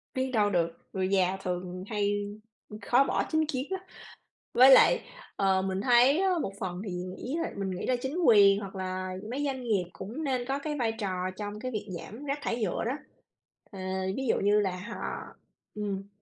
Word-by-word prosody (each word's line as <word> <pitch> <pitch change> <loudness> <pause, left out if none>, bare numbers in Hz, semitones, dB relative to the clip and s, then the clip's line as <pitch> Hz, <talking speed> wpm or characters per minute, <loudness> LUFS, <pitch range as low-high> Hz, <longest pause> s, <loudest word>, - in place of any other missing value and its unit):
Biết 260 0 -1
đâu 210 -4 +3
được, 170 -4 +2 0.2
người 190 -1 0
già 190 -1 +2
thường 180 0 -4
hay, 205 -2 0 0.6
ờ, 210 - -8
khó 250 +3 +4
bỏ - - 0
chính 315 0 +3
kiến 270 -2 -3
lắm. 380 -1 -2 0.7
Với 260 +2 +8
lại, 465 - +7 0.3
ờ, 190 -1 +2
mình 190 0 -2
thấy 250 - +5
á 385 0 +3
một 195 - -3
phần 180 -1 -4
thì 195 - -4
nghĩ 185 - -5
là - - -3
mình 195 -1 -2
nghĩ 185 - -4
là 255 - +2
chính 265 +4 -3
quyền 200 -3 +7
hoặc 195 -1 -8
là 185 0 -3 0.2
mấy 275 +3 -2
doanh 265 -2 -2
nghiệp 210 -6 +1
cũng 230 +11 -6
nên 255 -4 -1
có 270 +1 -1
cái 300 +1 -3
vai 230 -2 +1
trò 185 -4 -3
trong 210 0 -5
cái 255 +3 -4
việc 215 -2 -4
giảm 215 - -8
rác 280 +1 -2
thải 235 0 -2
nhựa 190 - -1
đó. 235 - 0 0.8
Ờ, 195 - -9 0.4
ví 265 -1 -2
dụ - - +2
như 205 +1 +4
là 195 -2 +1 0.2
họ 235 - -5 0.7
ừm. 200 -2 -3
210 Hz, 205 wpm, -29 LUFS, 190-260 Hz, 0.8 s, Với